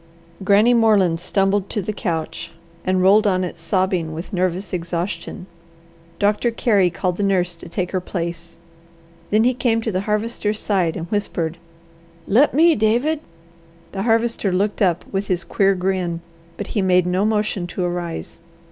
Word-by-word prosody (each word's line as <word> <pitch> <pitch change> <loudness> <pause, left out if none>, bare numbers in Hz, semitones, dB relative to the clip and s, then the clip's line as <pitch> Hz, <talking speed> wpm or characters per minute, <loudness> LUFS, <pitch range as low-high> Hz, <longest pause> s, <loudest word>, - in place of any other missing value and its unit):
Granny 205 +5 +5
Moreland 205 -8 +3
stumbled 195 +2 0
to - - -2
the 210 +2 -3
couch 170 -4 -4 0.3
and 185 0 +1
rolled 210 +3 +5
on 185 -2 +1
it 175 -1 -5
sobbing 175 -1 0
with 165 +6 -7
nervous 185 +1 -1
exhaustion. 175 +1 -4 0.7
Doctor 210 +4 +2
Carey 210 -5 +2
called 180 +1 -2
the 205 - -1
nurse 180 -3 +1
to 165 - -12
take 180 0 -3
her 185 - -1
place. 170 -2 -5 0.7
Then 215 +2 +3
he 250 +2 +3
came 235 -2 +1
to 220 - -1
the 185 -1 -1
Harvester's 210 0 -1
side 185 -7 0
and 165 - -4
whispered, 175 -5 -2 0.7
"Let 255 +9 +4
me, 325 +4 +5
David!" 240 +8 +1 0.7
The 195 - -4
Harvester 230 -2 +1
looked 200 +4 0
up 180 -3 +2
with 195 +1 -2
his 180 -2 0
queer 195 -1 +2
grin, 180 -2 -1 0.4
but 205 - -4
he 205 - +1
made 180 -1 +3
no 180 +2 +1
motion 210 -4 0
to 180 +1 -4
arise. 175 -2 -4
190 Hz, 160 wpm, -21 LUFS, 175-210 Hz, 0.7 s, Granny